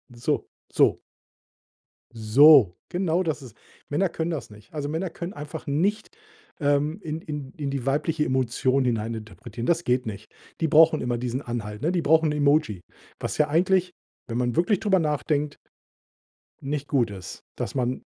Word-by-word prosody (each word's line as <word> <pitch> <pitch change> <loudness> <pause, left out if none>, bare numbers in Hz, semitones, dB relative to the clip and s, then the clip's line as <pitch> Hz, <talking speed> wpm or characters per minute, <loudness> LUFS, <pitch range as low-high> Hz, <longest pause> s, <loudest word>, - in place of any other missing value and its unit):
So, 120 - -1 0.3
so. - - +3 1.1
So. 115 - +6 0.2
Genau 175 -1 0
das 155 -4 -2
ist 125 -5 -11 0.4
Männer 170 +7 +1
können 165 0 -3
das 160 - -5
nicht. 105 +4 -17
Also, 145 -2 -3
Männer 165 +5 -2
können 170 +3 -7
einfach 145 0 -8
nicht, 200 - -1 0.5
ähm, 145 +4 +1
in 155 -2 -4
in 150 -4 -6
in 145 -3 -3
die 135 -2 -3
weibliche 150 +3 0
Emotion 130 0 +1
hineininterpretieren. 110 -1 -4
Das 170 0 +2
geht 125 -2 +1
nicht. 110 -1 -7 0.3
Die 160 - +1
brauchen 160 +1 +6
immer 120 -1 -1
diesen 125 +2 -3
Anhalt, 110 -4 -5
ne? 160 - +1
Die 180 -2 0
brauchen 160 0 +3
'n 150 - -2
Emoji. 145 - +2 0.4
Was - - -4
ja 150 -2 +2
eigentlich, 180 +3 +2 0.4
wenn 115 - -3
man 120 -1 0
wirklich 175 +3 +2
drüber 200 -3 +2
nachdenkt 150 -1 -1 1.1
nicht 145 +1 -3
gut 120 -7 +1
ist, 95 -2 -9
dass - - -4
man 125 -1 -1
145 Hz, 160 wpm, -25 LUFS, 120-160 Hz, 1.1 s, So